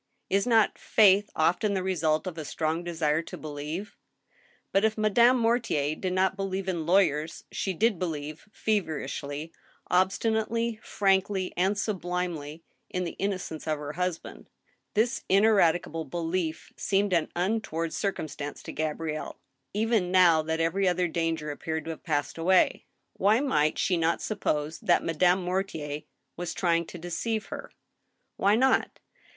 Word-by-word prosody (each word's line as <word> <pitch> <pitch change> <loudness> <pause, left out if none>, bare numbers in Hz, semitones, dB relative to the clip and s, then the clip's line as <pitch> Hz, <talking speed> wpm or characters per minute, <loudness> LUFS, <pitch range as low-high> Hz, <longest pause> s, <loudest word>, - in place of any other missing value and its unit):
Is 200 +4 +2
not 225 -3 +3
faith 205 0 +4
often 180 +6 +2
the 185 - -1
result 160 -4 +1
of 185 -3 -4
a 160 - -5
strong 160 +3 -2
desire 160 -2 0
to - - -9
believe? 155 +6 -6 0.8
But 195 - +3
if 220 0 +2
Madame 235 +4 +5
Mortier 230 - +1
did 185 +1 -3
not 190 +1 +2
believe 195 -1 -3
in 170 -4 -2
lawyers 165 -4 +2
she 190 -2 -2
did 215 -1 +2
believe, 155 +1 -5
feverishly, 155 -7 -2 0.4
obstinately, 220 +4 +1
frankly, 190 -1 +1
and 190 +3 +1
sublimely, 175 -6 -3 0.3
in 180 - -2
the 170 - -5
innocence 185 -6 -3
of 155 -1 0
her 145 0 -6
husband. 180 -1 -4 0.5
This 235 +4 +1
ineradicable 175 -5 +3
belief 165 +2 -3
seemed 195 0 +1
an 170 -3 +2
untoward 175 -3 -1
cir^ 200 +3 0
cumstance 145 -4 -6
to - - -6
Gabrielle, 155 0 -3 0.3
even 215 -3 +1
now 180 -3 +5
that 160 +1 -2
every 185 +4 +1
other 180 0 +2
danger 165 -2 -2
appeared 160 +2 -4
to 165 - -3
have 160 - -8
passed 150 -1 -2
away. 180 +2 +3 0.3
Why 210 +4 +4
might 155 - +1
she 180 - +1
not 165 0 +1
suppose 155 -7 -2
that - - +2
Madame 180 +3 +2
Mortier 170 -5 -3 0.4
was 175 0 -4
trying 170 -2 +1
to - - -8
deceive 175 +6 -3
her? - - -7 0.7
Why 200 +2 +4
not? 260 +3 +2
180 Hz, 145 wpm, -28 LUFS, 160-200 Hz, 0.8 s, Madame